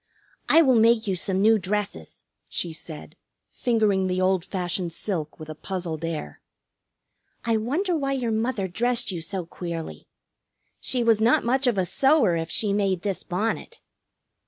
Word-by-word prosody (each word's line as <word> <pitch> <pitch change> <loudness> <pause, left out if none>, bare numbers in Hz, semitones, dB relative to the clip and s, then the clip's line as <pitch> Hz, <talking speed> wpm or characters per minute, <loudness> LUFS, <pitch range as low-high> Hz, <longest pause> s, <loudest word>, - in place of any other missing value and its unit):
"I 330 - +7
will 265 -3 +4
make 225 0 +4
you 195 -2 0
some 190 +2 0
new 220 0 +5
dresses," 190 - -4 0.3
she 170 -2 -3
said, 155 -1 -9 0.4
fingering 215 -6 +1
the 185 0 -1
old 185 -1 +2
fashioned 180 -2 -3
silk 165 -5 -3
with 155 - -8
a 155 - -6
puzzled 170 -1 -4
air. 155 - -4 1.0
"I 230 -1 +2
wonder 320 - 0
why 275 -3 0
your 245 -4 -1
mother 220 -2 0
dressed 235 +5 0
you 175 -3 -4
so 180 +1 -4
queerly? 170 -1 -6 0.7
She 250 -2 -1
was 225 -2 +3
not 230 +2 +4
much 260 +2 +2
of 235 -4 +2
a 185 - +2
sewer 270 - +3
if 165 0 -3
she 205 +2 +1
made 195 -3 0
this 200 -3 -2
bonnet!" 215 - -3
200 Hz, 160 wpm, -25 LUFS, 175-230 Hz, 1.0 s, I